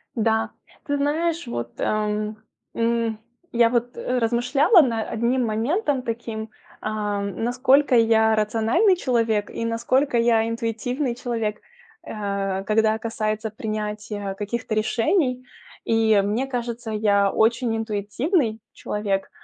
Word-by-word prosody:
Да, 225 Hz, -1 st, +1 dB, 0.3 s
ты 285 Hz, -2 st, 0 dB
знаешь, 315 Hz, +2 st, 0 dB
вот, 120 Hz, -, -4 dB
ам, 215 Hz, 0 st, -1 dB, 0.4 s
м, 230 Hz, -1 st, 0 dB, 0.3 s
я 235 Hz, -1 st, +4 dB
вот 245 Hz, 0 st, -1 dB
размышляла 250 Hz, -, +3 dB
над 230 Hz, -5 st, -1 dB
одним 240 Hz, +2 st, 0 dB
моментом 265 Hz, -, 0 dB
таким: 225 Hz, -2 st, -5 dB, 0.3 s
а, 210 Hz, -1 st, -2 dB
насколько 250 Hz, +6 st, +2 dB
я 220 Hz, -1 st, +4 dB
рациональный 225 Hz, -, +2 dB
человек 230 Hz, -8 st, 0 dB
и 230 Hz, -, -4 dB
насколько 240 Hz, +3 st, +1 dB
я 230 Hz, -1 st, +3 dB
интуитивный 235 Hz, +3 st, -2 dB
человек, 225 Hz, -4 st, -3 dB, 0.4 s
а, 200 Hz, -2 st, -3 dB
когда 220 Hz, +2 st, +2 dB
касается 220 Hz, -1 st, -2 dB
принятия 210 Hz, -2 st, -4 dB
каких-то 215 Hz, +3 st, -3 dB
решений. 250 Hz, -, +1 dB, 0.4 s
И 220 Hz, -2 st, +3 dB
мне 215 Hz, +7 st, -1 dB
кажется, 240 Hz, -3 st, -4 dB
я 205 Hz, -2 st, +2 dB
очень 230 Hz, +1 st, +2 dB
интуитивный 225 Hz, -, -1 dB
человек. 200 Hz, -2 st, -2 dB
225 Hz, 110 wpm, -23 LUFS, 215-245 Hz, 0.4 s, я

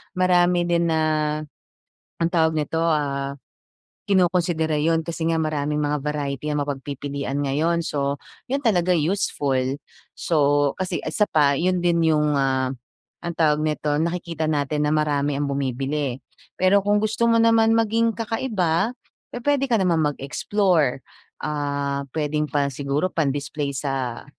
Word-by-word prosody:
Marami 180 Hz, -1 st, +3 dB
din 170 Hz, 0 st, +1 dB
na, 160 Hz, -1 st, +1 dB, 1.2 s
ang 165 Hz, -, +2 dB
tawag 160 Hz, -2 st, +3 dB
nito, 160 Hz, +2 st, -1 dB
ah, 140 Hz, -4 st, 0 dB, 0.7 s
kinokonsidera 175 Hz, -4 st, +1 dB
yun 160 Hz, +2 st, +2 dB
kasi 165 Hz, 0 st, -4 dB
nga 165 Hz, -1 st, +1 dB
maraming 150 Hz, -1 st, -1 dB
mga 150 Hz, 0 st, 0 dB
variety 150 Hz, 0 st, -2 dB
ang 150 Hz, -, 0 dB
mapagpipilian 140 Hz, 0 st, -4 dB
ngayon. 155 Hz, +5 st, +1 dB
So, 140 Hz, -3 st, -2 dB, 0.2 s
yun 275 Hz, +2 st, -2 dB
talaga 185 Hz, -8 st, +2 dB
useful. 145 Hz, -6 st, 0 dB, 0.3 s
So, 145 Hz, -3 st, +1 dB
kasi 185 Hz, -1 st, -2 dB
isa 160 Hz, +7 st, +1 dB
pa 145 Hz, -7 st, +2 dB
yun 180 Hz, +3 st, +1 dB
din 170 Hz, -1 st, +2 dB
yung, 150 Hz, -1 st, +2 dB
ah, 130 Hz, -1 st, 0 dB, 0.5 s
ang 170 Hz, -, -2 dB
tawag 155 Hz, -2 st, +2 dB
nito, 150 Hz, -1 st, 0 dB
nakikita 170 Hz, 0 st, -2 dB
natin 150 Hz, -1 st, 0 dB
na 150 Hz, -, +1 dB
marami 145 Hz, -2 st, +1 dB
ang 140 Hz, +1 st, -1 dB
bumibili. 135 Hz, 0 st, -2 dB, 0.4 s
Pero 190 Hz, +2 st, +4 dB
kung 205 Hz, 0 st, +3 dB
gusto 215 Hz, +2 st, 0 dB
mo 230 Hz, 0 st, +4 dB
naman 225 Hz, 0 st, +4 dB
maging 225 Hz, 0 st, +2 dB
kakaiba, 220 Hz, -4 st, -1 dB, 0.4 s
pupuwede 275 Hz, +3 st, 0 dB
ka 235 Hz, -5 st, +1 dB
naman 170 Hz, -4 st, +2 dB
mag-explore. 150 Hz, 0 st, 0 dB, 0.4 s
Ah, 140 Hz, -2 st, -2 dB
puwedeng 150 Hz, -1 st, -1 dB
pa 145 Hz, -1 st, +1 dB
siguro 140 Hz, +4 st, -1 dB
pang 155 Hz, -6 st, 0 dB
display 145 Hz, 0 st, -3 dB
sa 130 Hz, -3 st, -3 dB
155 Hz, 140 wpm, -23 LUFS, 140-180 Hz, 1.2 s, Pero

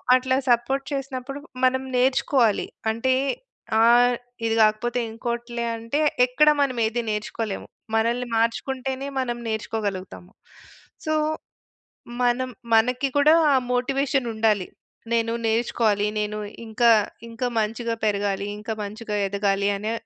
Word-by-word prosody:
అట్లా 260 Hz, 0 st, +1 dB
సపోర్ట్ 265 Hz, +3 st, +2 dB
చేసినప్పుడు, 275 Hz, 0 st, -5 dB, 0.2 s
మనం 260 Hz, +1 st, +2 dB
నేర్చుకోవాలి. 255 Hz, -3 st, +2 dB, 0.2 s
అంటే, 250 Hz, +4 st, +1 dB, 0.7 s
ఆహ్, 240 Hz, +1 st, +5 dB, 0.3 s
ఇది 225 Hz, -, +1 dB
గాకపోతే 225 Hz, +3 st, +1 dB
ఇంకోటిలే 235 Hz, +1 st, -4 dB
అంటే, 230 Hz, +7 st, -2 dB, 0.3 s
ఎక్కడా 300 Hz, +4 st, +4 dB
మనమేదీ 240 Hz, -3 st, 0 dB
నేర్చుకోలేము. 210 Hz, 0 st, -4 dB, 0.3 s
మనల్ని 235 Hz, +2 st, 0 dB
మార్చుకుంటేనే, 260 Hz, +3 st, -1 dB
మనం 240 Hz, -2 st, -2 dB
నేర్చుకోగలుగుతాము. 205 Hz, -5 st, -4 dB, 0.8 s
సో, 310 Hz, -, +1 dB, 1.1 s
మనం 245 Hz, +1 st, +1 dB, 0.3 s
మనకి 250 Hz, +4 st, +2 dB
కూడా 300 Hz, +2 st, +6 dB, 0.2 s
ఆ -, -, +5 dB, 0.2 s
మోటివేషనుండాలి. 245 Hz, -6 st, +1 dB, 0.5 s
నేను 230 Hz, 0 st, +1 dB
నేర్చుకోవాలి, 220 Hz, -2 st, +1 dB
నేను 210 Hz, 0 st, -2 dB, 0.3 s
ఇంకా 235 Hz, +2 st, +2 dB, 0.4 s
ఇంకా 230 Hz, +2 st, -3 dB
మంచిగా 230 Hz, +2 st, -1 dB
పెరగాలి, 200 Hz, -1 st, 0 dB
ఇంకా 220 Hz, +1 st, -4 dB
మంచిగా 210 Hz, +1 st, -5 dB
ఎదగాలి, 200 Hz, 0 st, 0 dB
అనే, 215 Hz, +2 st, -3 dB
235 Hz, 105 wpm, -24 LUFS, 220-255 Hz, 1.1 s, కూడా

